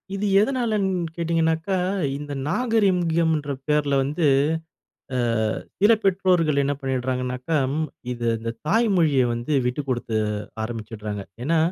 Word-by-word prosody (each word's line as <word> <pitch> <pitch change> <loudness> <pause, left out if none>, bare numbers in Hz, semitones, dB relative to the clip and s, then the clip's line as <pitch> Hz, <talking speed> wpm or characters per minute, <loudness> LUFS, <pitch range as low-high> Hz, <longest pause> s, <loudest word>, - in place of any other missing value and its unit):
இது 200 +1 -2
எதனாலன்னு 205 -8 0
கேட்டிங்கனாக்கா, 165 +2 0 0.4
இந்த 145 0 -6
நாகரிகம்ன்ற 170 - +1 0.2
பேருல 150 -2 +2
வந்து, 150 +5 0 0.9
அ - - 0 0.6
சில 205 +3 +6
பெற்றோர்கள் 180 -6 +2
என்ன 140 +1 0
பண்ணிடுறாங்கனாக்கா, 130 +2 -2 0.6
இது 120 -1 -4
இந்த 115 +1 -4
தாய் 225 +7 +3
மொழிய 150 -6 +4
வந்து 120 +5 -3
விட்டு 125 +4 -1
குடுத்து 120 -3 -1 0.5
ஆரம்பிச்சிடுறாங்க. 110 -2 -5 0.2
ஏன்னா, 165 +4 +2
155 Hz, 110 wpm, -24 LUFS, 130-185 Hz, 0.9 s, சில